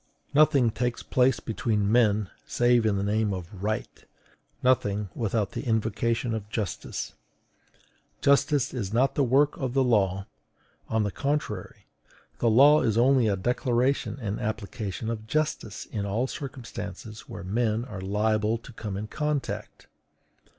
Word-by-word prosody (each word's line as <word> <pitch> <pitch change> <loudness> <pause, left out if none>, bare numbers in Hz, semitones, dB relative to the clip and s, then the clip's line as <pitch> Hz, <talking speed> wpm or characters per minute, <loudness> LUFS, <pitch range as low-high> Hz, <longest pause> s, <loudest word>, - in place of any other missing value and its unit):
Nothing 145 -5 +5
takes 120 +1 -2
place 130 -1 +2
between 110 -3 -1
men 110 -4 +3 0.2
save 120 -2 +3
in 105 - +2
the 100 - -1
name 105 0 +1
of 90 +1 -8
RIGHT; 110 +1 -3 0.6
nothing 105 -6 +2
without 110 -3 -1
the - - -4
invocation 115 0 0
of 105 -2 -4
justice. 105 -5 -4 1.1
Justice 140 -1 +3
is 105 -7 -3
not 125 +5 +2
the 145 - +2
work 140 +4 +3
of 130 -2 -3
the 135 - +4
law: 100 -6 +2 0.6
on 110 -1 +1
the 105 - -1
contrary, 140 -9 -3 0.5
the 115 - +3
law 140 +7 +7
is 110 -2 +1
only 125 0 +4
a 100 - +2
declaration 125 +6 0
and 105 -3 -3
application 110 -1 -4
of 110 -1 -6
JUSTICE 150 -7 -2
in 105 -3 -2
all 105 +5 0
circumstances 115 -6 -7
where 100 - -7
men 110 +4 0
are 105 -7 -7
liable 105 +3 +1
to 115 +1 -13
come 105 -3 -5
in 105 - -4
contact. 150 +3 -3
115 Hz, 145 wpm, -27 LUFS, 105-125 Hz, 1.1 s, law